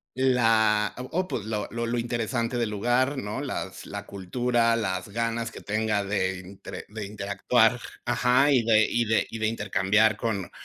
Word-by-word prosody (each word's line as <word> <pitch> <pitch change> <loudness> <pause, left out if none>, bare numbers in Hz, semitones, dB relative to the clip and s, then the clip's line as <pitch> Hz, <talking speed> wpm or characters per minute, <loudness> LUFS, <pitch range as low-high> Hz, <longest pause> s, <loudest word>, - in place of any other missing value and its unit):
La, 115 -5 +3
o 125 +1 -6
oh, 185 - -1
pues, 105 - -4
lo 105 -2 -3
lo 115 0 -2
lo 120 +1 -1
interesante 120 +1 -1
del 115 -3 0
lugar, 120 +6 +1
¿no? 105 +1 -4
Las 140 -3 -5
la - - -6
cultura, 115 +4 0
las 95 -4 -2
ganas 115 +2 -2
que - - -10
tenga 105 -1 0
de 95 -2 -1
intre 95 +2 -9
de 105 -1 -6
interactuar, 105 +4 +1 0.2
ajá, 125 +4 +3
y 125 -4 +4
de 110 -1 +5
y 120 0 +2
de 110 +1 +2
y 115 - -6
de 110 - +1
intercambiar 110 0 +2
con, 105 -6 -2
110 Hz, 175 wpm, -26 LUFS, 105-120 Hz, 0.2 s, de